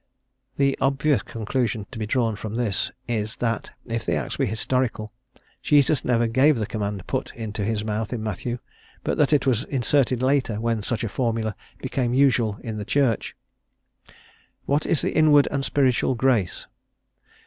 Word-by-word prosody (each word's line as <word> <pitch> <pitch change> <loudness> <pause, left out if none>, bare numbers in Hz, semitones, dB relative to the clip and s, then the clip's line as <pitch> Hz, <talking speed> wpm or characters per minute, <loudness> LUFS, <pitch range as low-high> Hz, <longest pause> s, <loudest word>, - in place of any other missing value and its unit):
The 140 -1 +3
obvious 140 +1 +2
conclusion 115 -1 -2
to 120 - -7
be 110 - -2
drawn 115 -2 +1
from 110 +1 -6
this 115 -5 0 0.2
is, 110 -3 -2
that 115 -2 -2 0.2
if 115 -1 -3
the - - 0
Acts - - -3
be 135 - +1
historical, 110 -1 -1 0.5
Jesus 145 -2 +3
never 120 -1 +2
gave 130 +5 +4
the 110 - -1
command 100 -3 -4
put - - -2
into 110 -2 -4
his 105 0 -1
mouth 110 0 -2
in 115 -3 -3
Matthew, 110 +3 -3 0.5
but - - -1
that 150 - +4
it 145 -3 +3
was 120 -4 +2
inserted 130 -1 +1
later 130 -5 +1
when 115 -1 0
such 115 +3 -2
a - - 0
formula 110 -2 -1 0.2
became 125 -2 -1
usual 125 -6 +3
in 110 -2 -4
the 105 - -3
Church. 130 -6 +1 1.3
"What 145 +2 +1
is 160 - +1
the - - 0
inward 150 -2 +6
and 140 -1 -1
spiritual 130 -2 +2
grace? 115 -7 +1
120 Hz, 165 wpm, -24 LUFS, 110-135 Hz, 1.3 s, inward